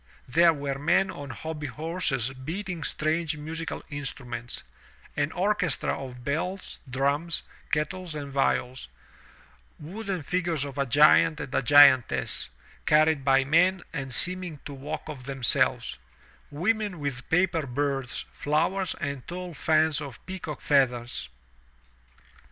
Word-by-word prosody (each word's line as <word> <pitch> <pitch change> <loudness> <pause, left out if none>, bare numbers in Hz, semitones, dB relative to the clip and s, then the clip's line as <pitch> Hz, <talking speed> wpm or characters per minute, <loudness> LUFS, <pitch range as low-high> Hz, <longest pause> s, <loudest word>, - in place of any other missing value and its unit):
There 165 +6 +5
were 140 -3 -3
men 175 +6 +2
on 145 -1 -8
hobby 150 +4 -5
horses 150 -5 -1
beating 165 +6 -5
strange 155 +1 0
musical 160 +2 -5
instmments; 125 -4 -5 0.5
an 145 +1 0
orchestra 180 -4 0
of 125 -2 -8
bells, 175 +8 -3
dmms, 140 +5 0 0.3
kettles 160 +3 -2
and 145 -2 -6
viols; 130 -2 0 0.9
wooden 190 +1 -5
figures 170 -2 -1
of 140 0 -7
a 140 - +1
giant 155 +4 +5
and - - -6
giantess, 130 - +5 0.4
carried 155 -1 +4
by 135 0 +4
men 175 +6 +3
and 135 -4 -4
seeming 180 +3 +1
to 145 - -6
walk 150 +4 -6
of 140 -5 -8
themselves; 135 -3 +1 0.5
women 200 +4 -1
with 140 -4 -4
paper 165 -3 +2
birds, 135 0 -2
flowers, 170 +6 0
and 140 -4 -4
tall 180 0 -6
fans 155 0 +2
of 140 -4 -9
peacock 185 -6 -6
feathers. 120 - +1
150 Hz, 120 wpm, -27 LUFS, 135-170 Hz, 0.9 s, There